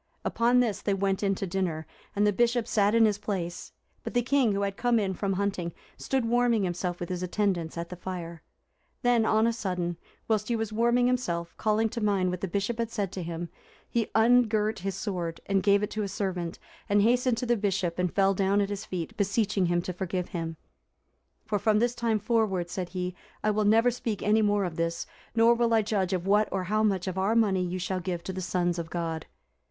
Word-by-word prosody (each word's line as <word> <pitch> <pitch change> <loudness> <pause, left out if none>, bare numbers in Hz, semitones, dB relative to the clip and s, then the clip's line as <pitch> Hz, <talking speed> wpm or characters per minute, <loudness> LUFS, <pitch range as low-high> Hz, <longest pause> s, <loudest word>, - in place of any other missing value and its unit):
Upon 240 +2 +3
this 225 -5 -1
they 200 - 0
went 195 0 0
in 195 -1 +1
to 195 - -3
dinner, 175 -4 -2 0.3
and 205 +1 +3
the 205 - +3
Bishop 240 +2 +1
sat 210 -1 +2
in 230 -1 +6
his 205 -2 +1
place; 180 -5 -4 0.3
but - - -6
the 245 - +3
king, 260 -2 +3
who 200 0 -1
had 200 -1 -2
come 240 +1 +2
in 195 -3 0
from 195 +1 -1
hunting, 185 -3 -2 0.2
stood 265 -3 -1
warming 235 -2 +2
himself, 175 0 -2
with 175 - -5
his 180 -1 -3
attendants, 180 -3 -1
at 170 0 -4
the 180 - -6
fire. 175 -2 -6 0.6
Then, 240 -2 +3
on 220 +1 +3
a 230 - +2
sudden, 180 -5 -2 0.3
whilst 215 -2 +1
he 235 - 0
was 225 -1 -3
warming 235 +2 +3
himself, 195 -10 -1
calling 215 +1 +2
to 235 - -5
mind 195 -3 +1
what 180 - -4
the 195 - -1
bishop 200 +6 -2
had 230 -1 -1
said 205 -5 -2
to 190 - -5
him, 170 0 -5 0.4
he 230 -2 -1
ungirt 220 -2 +3
his 195 0 -3
sword, 175 -5 -3
and 195 -1 +1
gave 200 +1 +3
it 210 - -2
to 215 - -2
a 205 - -1
servant, 185 -4 -3 0.3
and 205 0 +4
hastened 245 +1 +3
to 250 - -2
the 240 0 +2
Bishop 195 -5 -1
and 180 -1 +1
fell 195 0 +4
down 195 +1 +2
at 200 0 0
his 205 +1 -4
feet, 175 -6 -5
beseeching 200 -1 +1
him 175 0 +1
to 185 - -4
forgive 180 0 -3
him; 165 -2 -4 0.9
"For 205 -1 -1
from 215 +1 +3
this 240 +2 +2
time 235 -2 0
forward," 210 -5 0
said 180 -1 -3
he, 180 0 -3 0.3
"I 215 - +3
will 210 0 +1
never 225 +4 +5
speak 230 -4 -4
any 215 +1 +3
more 205 -2 +2
of 170 -3 -5
this, 165 0 -1 0.3
nor 230 +1 +6
will 235 -1 +2
I 220 - +3
judge 200 -3 0
of 185 -2 -1
what 210 +2 +3
or 190 -1 -1
how 215 +4 0
much 195 -4 +1
of 190 0 -3
our 200 +4 +1
money 200 -5 +3
you 180 +1 -3
shall 185 +1 -2
give 175 -1 -4
to 190 - -5
the 185 - -4
sons 175 -1 0
of 165 -1 -5
God." 165 -2 -3
200 Hz, 225 wpm, -28 LUFS, 180-220 Hz, 0.9 s, in